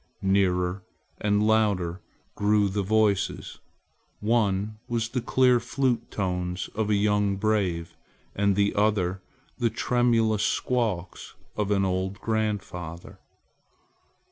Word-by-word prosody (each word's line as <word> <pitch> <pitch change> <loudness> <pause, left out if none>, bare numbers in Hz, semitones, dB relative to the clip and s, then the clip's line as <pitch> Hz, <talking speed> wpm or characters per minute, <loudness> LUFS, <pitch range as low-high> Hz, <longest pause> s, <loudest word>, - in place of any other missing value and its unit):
Nearer 95 -1 +1 0.4
and 105 0 +2
louder 100 -5 +1 0.3
grew 105 0 +2
the 100 +1 -1
voices 100 -2 0 0.6
one 105 -1 0
was 115 -2 -1
the 125 +1 -2
clear 125 0 +3
flute 120 -1 -1
tones 90 -2 -3
of 105 0 -1
a 105 - +3
young 105 -1 +2
brave 95 -5 -1 0.4
and 100 -1 +2
the 100 +1 +2
other 100 -3 +1 0.4
the 120 - +2
tremulous 115 -2 +1
squeaks 105 -7 -1 0.2
of 105 -1 -1
an 100 -2 +2
old 95 +1 -2
grandfather. 100 -6 -3
105 Hz, 110 wpm, -26 LUFS, 95-110 Hz, 0.6 s, clear